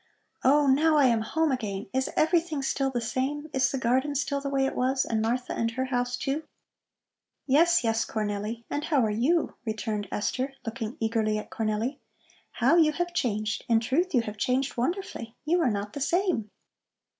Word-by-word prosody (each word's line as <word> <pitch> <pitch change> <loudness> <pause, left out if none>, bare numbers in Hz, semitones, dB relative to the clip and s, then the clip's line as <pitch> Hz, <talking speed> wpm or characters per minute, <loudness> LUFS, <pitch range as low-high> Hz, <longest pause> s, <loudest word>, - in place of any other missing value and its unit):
"Oh, 290 +3 +5
now 300 +4 +4
I 285 - +5
am 230 -3 +3
home 320 +7 0
again! 210 -6 -3
Is 260 0 0
everything 320 -3 +2
still 270 0 0
the 250 -2 -2
same? 270 +6 -2
Is 265 - +3
the 270 - -1
garden 260 +4 +1
still 280 0 -1
the 280 - -3
way 270 -1 +1
it 270 - -2
was? 260 +1 +1
And 220 -1 0
Martha 245 +3 -1
and 230 - 0
her 260 +3 -2
house, 245 -1 -1
too?" 275 +5 -2 1.0
"Yes, 335 +4 +4
yes, 225 0 +1
Cornelli. 215 +1 -3
And 290 +1 -3
how 275 -7 +2
are 215 - 0
you?" 280 +11 +1
returned 215 -2 -3
Esther, 260 +5 -2
looking 225 0 -4
eagerly 220 -1 +1
at 210 - -7
Cornelli. 220 +5 -2 0.5
"How 340 - +3
you 310 -2 +5
have 350 +2 -2
changed! 215 -8 -1
In 230 -1 +5
truth 300 +9 0
you 245 - +5
have 215 -2 -7
changed 255 +5 0
wonderfully. 250 - -3
You 345 +3 +2
are 315 - +3
not 205 -1 -3
the 285 - -5
same." 340 - +1
255 Hz, 185 wpm, -27 LUFS, 225-290 Hz, 1.0 s, Oh